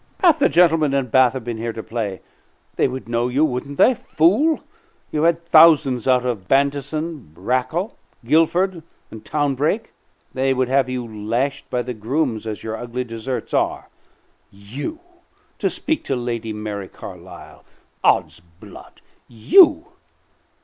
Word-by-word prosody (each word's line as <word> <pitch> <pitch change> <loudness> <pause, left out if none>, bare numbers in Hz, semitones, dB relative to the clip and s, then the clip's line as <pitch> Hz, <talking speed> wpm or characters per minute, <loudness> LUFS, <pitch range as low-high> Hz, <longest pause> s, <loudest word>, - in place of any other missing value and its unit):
"Half 340 -5 +5
the - - +4
gentlemen 160 -4 +3
in 135 -3 -1
Bath 130 0 +4
have 130 -3 -5
been 115 -1 -5
here 115 0 -3
to 110 - -7
play. 105 -5 -4 0.5
They - - +2
would 130 -1 -7
know 120 +1 0
you, 135 +5 +2
wouldn't 140 0 -4
they, 260 - +5
fool? 245 - +2 0.5
You've 155 +1 0
had 170 0 +1
thousands 155 -7 +5
out 125 -1 +3
of 110 -7 -3
Bantison, 140 - -1
Rakell, 130 - -1 0.3
Guilford, 165 +6 +2 0.3
and 110 - -10
Townbrake. 150 - -1 0.4
They 135 0 +1
would 130 -1 0
have 135 -1 +2
you 125 -1 -3
lashed 115 +6 -3
by 125 -1 -1
the 125 +1 -5
grooms 115 0 -2
as 105 -3 -5
your 110 0 -4
ugly 120 +2 -4
deserts 120 +2 -6
are. - - -1 0.6
You 125 - -7 0.6
to - - +1
speak 315 - -3
to 135 - -1
Lady 120 -2 -4
Mary 105 -2 -5
Carlisle! - - -12 0.4
'Od's - - +2
blood! 85 0 -16 0.3
You! 315 - +5
130 Hz, 145 wpm, -21 LUFS, 115-155 Hz, 0.6 s, Half